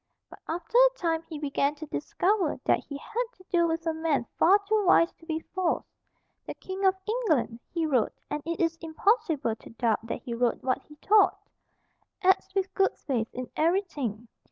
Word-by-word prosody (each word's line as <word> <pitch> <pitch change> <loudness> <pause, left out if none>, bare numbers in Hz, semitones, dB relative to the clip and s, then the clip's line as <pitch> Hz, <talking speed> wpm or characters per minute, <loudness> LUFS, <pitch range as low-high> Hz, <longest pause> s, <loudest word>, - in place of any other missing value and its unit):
But - - -12
after 350 +9 0
a - - +5
time 325 -2 0
he 315 - -5
began 285 0 0
to 310 +1 -8
discover 350 +2 0
that - - +3
he 280 - -8
had 450 +11 -2
to 370 - -19
do 340 -2 +3
with 330 0 -2
a 325 - +1
man 315 -6 0
far 380 +4 +7
too 430 0 +2
wise 350 -2 +5
to 330 - -20
be 320 -1 -2
false. 370 -3 0 0.6
"The - - -5
King 380 +1 -6
of 380 0 +5
England," 335 - 0
he 335 -2 0
wrote, 260 -8 +1
and 295 0 -3
it 335 0 -3
is 330 -1 +1
impossible 325 - +1
to - - -14
doubt 230 -1 0
that - - -4
he 235 - -5
wrote 235 0 0
what 255 -1 0
he 300 - -16
thought, 415 +7 +4 0.9
"acts 375 +1 +3
with 385 -1 0
good 390 -1 +2
faith 240 -6 -2
in 250 0 -6
every 345 +6 +2
thing. 240 - -5
325 Hz, 195 wpm, -28 LUFS, 280-380 Hz, 0.9 s, far